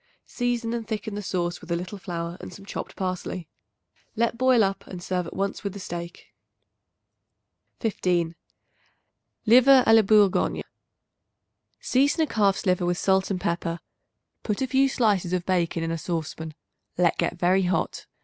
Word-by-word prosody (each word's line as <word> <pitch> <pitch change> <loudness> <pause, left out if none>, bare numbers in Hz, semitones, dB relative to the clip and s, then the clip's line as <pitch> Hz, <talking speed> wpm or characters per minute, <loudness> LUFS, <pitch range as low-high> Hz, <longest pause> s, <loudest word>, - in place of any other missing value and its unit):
Season 240 -2 -2
and 230 -2 -4
thicken 220 -1 -4
the 205 - -4
sauce 175 -3 -2
with 175 - -13
a - - +2
little 185 +4 -5
flour 170 -2 -4
and - - -8
some 195 +2 -12
chopped - - -6
parsley. 185 -2 -4 0.7
Let 235 +1 +1
boil 255 -1 +4
up 195 0 -2
and 180 - -7
serve 180 0 -2
at - - -9
once 195 +1 -2
with 200 -2 -3
the 200 - -8
steak. 170 -1 -7 1.5
15. 180 -6 0 1.1
Liver 255 +3 +7
a 225 - +5
la 225 - +8
Bourgogne. 205 -2 +3 1.2
Season 280 +5 +2
a - - +4
calf's 205 -8 +1
liver 180 -2 +2
with 175 0 0
salt 190 0 +2
and 190 -2 -1
pepper; 170 -1 -2 0.6
put 210 -2 -2
a 265 - +1
few 270 +1 +3
slices 205 -8 +1
of 180 -1 -1
bacon 175 -3 0
in 165 - -2
a 165 - -2
saucepan; 160 -1 -4 0.4
let 175 -1 +2
get 175 - 0
very 180 +2 +3
hot. 180 - -1
190 Hz, 160 wpm, -25 LUFS, 175-220 Hz, 1.5 s, la